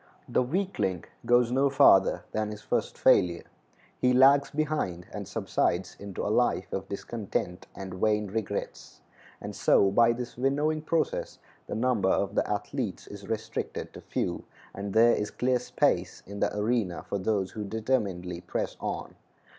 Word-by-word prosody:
The - - +2
weakling 130 - -1 0.2
goes 120 0 +4
no 135 +2 +3
farther 135 -7 +5
than 110 -1 -1
his 105 0 -8
first - - -1
failure; 85 -1 +4 0.6
he 125 0 +3
lags 140 +2 +6
behind, 150 - -2
and - - -5
subsides 90 +1 -1
into 100 -2 -5
a - - +1
life - - +1
of 95 0 -4
discontent 100 -3 -4
and 95 -1 -7
vain 105 +3 +1
regrets; 105 +1 -5 0.4
and - - -7
so 95 - +4
by 115 +3 +5
this 120 0 -6
winnowing 145 +4 +1
process 160 +1 -1 0.3
the - - -4
number 115 -5 +1
of 100 +1 +1
the - - 0
athletes 105 0 -3
is 100 -1 -10
restricted 110 0 -4
to - - -10
few, - - -3 0.3
and 100 0 -5
there 115 +1 +6
is 105 - -1
clear 125 0 +1
space 125 - 0
in 100 +1 -8
the - - +1
arena 105 -5 0
for 100 - -2
those 95 -1 0
who 105 - -5
determinedly 100 -6 -2
press 90 - -3
on. - - -4
110 Hz, 155 wpm, -28 LUFS, 95-125 Hz, 0.6 s, lags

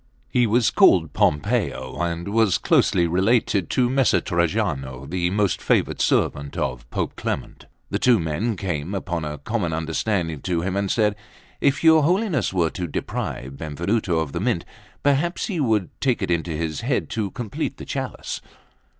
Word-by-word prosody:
He 125 -1 +3
was 115 +1 +3
called - - +5
Pompeo, 95 - 0
and 85 +2 -2
was 105 -3 +3
closely 85 - +3
related 95 +1 +2
to 125 -1 +2
Messer 130 0 +3
Trajano, 70 -7 -1
the 85 +2 0
most 100 -1 0
favoured - - +1
servant 70 0 +1
of - - -3
Pope - - -3
Clement. - - -5 0.2
The - - 0
two 125 -2 +5
men 85 +8 -1
came, 90 -1 -3
upon 85 -3 -3
a 75 0 -4
common 85 +2 -2
understanding, 80 0 -1
to 85 -2 -1
him 95 +2 -2
and 100 0 0
said: 105 -1 +2 0.4
"If 140 +1 +1
your 160 -1 +7
Holiness 185 +4 +1
were 85 -4 +1
to 90 -2 -4
deprive 70 -3 -4
Benvenuto 85 +4 -1
of 80 -3 -1
the - - -3
Mint, - - 0 0.4
perhaps 145 +5 +1
he 185 -6 -3
would 110 - +1
take 130 -3 +1
it - - -1
into 85 0 0
his 80 -1 -3
head 125 +2 0
to 105 -3 -1
complete 110 +1 -4
the - - -8
chalice." - - -4
95 Hz, 165 wpm, -23 LUFS, 80-115 Hz, 0.4 s, your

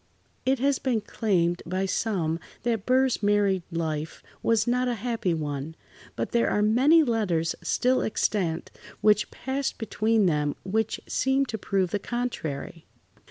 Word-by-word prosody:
It 265 +1 +3
has 275 +2 +1
been 245 -5 0
claimed 180 -6 0
by 185 +3 -1
some 180 -5 -1 0.2
that 225 -4 -1
Burr's 260 0 +3
married 205 -2 +2
life 160 -2 -3 0.2
was 225 -2 +2
not 250 +1 +1
a 245 - 0
happy 225 -6 -1
one, 150 0 -4 0.4
but - - -3
there 235 - +2
are 210 - +1
many 270 +10 +5
letters 200 - 0
still 255 +1 +2
extant 180 -6 -1 0.3
which 210 -1 +4
passed 270 +1 -3
between 220 -1 +1
them 150 -4 +1
which 220 +3 -1
seemed 265 0 +1
to 220 - -3
prove 190 -3 0
the 205 - 0
contrary. 170 - -4
210 Hz, 145 wpm, -26 LUFS, 170-245 Hz, 0.4 s, many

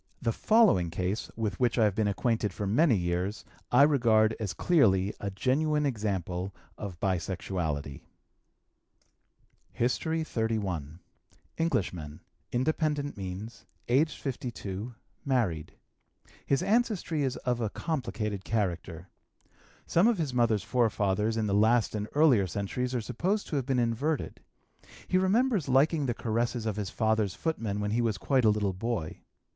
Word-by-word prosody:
The 115 - 0
following 210 - +4
case, 90 +5 -2
with 105 -4 -3
which 125 -1 +2
I 115 - +4
have 105 -2 +3
been 105 +1 0
acquainted 110 +1 0
for 105 - -4
many 120 +6 +4
years, 90 +3 -2 0.3
I 125 +3 +7
regard 115 -7 +4
as 105 -5 -2
clearly 100 - +3
a 100 - -3
genuine 150 +9 +1
example 95 - -2 0.2
of 95 -5 -7
bisexuality: 85 -6 -2 1.7
HISTORY 160 +7 0
XXXI. 100 - -2 0.6
Englishman, 90 - -1 0.3
independent 145 +2 0
means, 100 +4 -7 0.2
aged 145 +6 +2
52, 120 -4 -5 0.3
married. 110 - 0 0.7
His 140 - +2
ancestry 210 -8 +1
is 130 -2 -1
of 125 -1 -1
a 110 - 0
complicated 110 - -3
character. 90 -5 -2 0.8
Some 175 +6 +3
of 235 -3 +3
his 150 -6 -2
mother's 115 -5 +2
forefathers 110 -2 +1
in 110 - 0
the 100 - 0
last 110 +3 +3
and 105 -1 -3
earlier 135 -11 +5
centuries 125 +7 -3
are 120 - 0
supposed 190 - -1
to - - -2
have 135 -3 -1
been 135 -2 +1
inverted. 125 +6 -1 0.7
He 185 - +2
remembers 200 - +2
liking 140 +3 +3
the 120 - -1
caresses 115 +1 -1
of 110 -3 -1
his 100 -3 -3
father's 110 -3 0
footmen 115 -11 -2
when 105 0 -1
he 120 +2 +1
was 110 -4 0
quite 130 +4 +1
a - - +7
little 105 -2 +1
boy. 100 -4 -3
115 Hz, 140 wpm, -29 LUFS, 100-135 Hz, 1.7 s, I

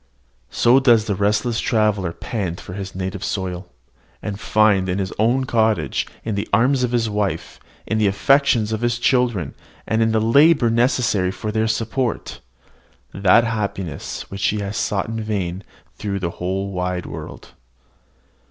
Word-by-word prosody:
So 120 +3 +4
does 120 -5 +4
the 105 - -1
restless 105 +4 0
traveller 105 -5 +1
pant 90 -2 -4
for - - -9
his 95 -1 -6
native 95 +1 -4
soil, 90 -3 -3 0.5
and 100 -1 -5
find 105 -4 +2
in 90 - -1
his 95 -2 -3
own 120 +5 +2
cottage, 110 -3 +1 0.2
in 110 - -2
the 100 0 -3
arms 125 +5 +3
of 125 - 0
his 120 -2 +1
wife, 105 -2 -3 0.3
in 110 - -1
the 105 - +3
affections 115 +1 +3
of 110 0 -2
his 120 0 +1
children, 120 - +1 0.3
and 110 0 0
in 110 0 +3
the 110 - +2
labour 135 +2 +4
necessary 115 -5 +2
for 105 +3 -4
their 110 +1 0
support, 115 +2 -2 0.7
that 100 +4 +4
happiness 100 -8 -4
which 95 -1 -1
he 105 - 0
had 100 -1 -3
sought 105 -2 -1
in 115 0 -4
vain 100 -3 -3 0.3
through 100 -2 -4
the 85 -3 -3
wide 90 -1 -2
world. - - -9
105 Hz, 155 wpm, -21 LUFS, 95-115 Hz, 0.7 s, So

